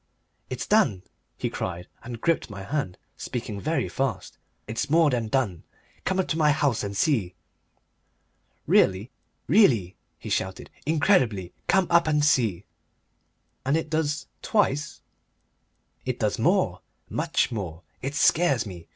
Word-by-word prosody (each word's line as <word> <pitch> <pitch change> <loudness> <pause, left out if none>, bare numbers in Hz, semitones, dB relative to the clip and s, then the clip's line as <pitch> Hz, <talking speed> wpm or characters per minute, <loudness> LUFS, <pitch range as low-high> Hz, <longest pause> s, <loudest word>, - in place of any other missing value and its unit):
"It's 130 -1 -4
done," 140 - +3 0.3
he - - -2
cried, 90 -1 -4
and 120 0 -7
gripped 165 +1 0
my 100 -2 -7
hand, 135 -5 -3 0.2
speaking 110 -4 -5
very 160 +2 0
fast; 130 -9 -3 0.3
"it's 110 +4 -3
more 160 -1 +4
than 120 -3 -1
done. 110 -8 0 0.4
Come 190 0 0
up 190 - +1
to 160 - 0
my 150 -1 +5
house 145 -7 +1
and 100 -1 -4
see." 105 - +1 1.3
"Really?" 95 +6 +3 0.3
"Really!" 125 - +4 0.2
he - - -8
shouted. 95 0 -2 0.2
"Incredibly! 130 - +2
Come 190 -1 +4
up 170 -1 +5
and 150 -1 +3
see." 110 -10 +2 1.0
"And 140 +4 +2
it 160 -1 -4
does 155 -1 0 0.2
twice? 155 -9 0 1.0
"It - - -2
does - - -1
more, - - +2 0.3
much - - 0
more. 90 -6 -5 0.2
It 135 +3 -4
scares 160 -7 +3
me. 90 -5 -9
130 Hz, 135 wpm, -26 LUFS, 100-155 Hz, 1.3 s, my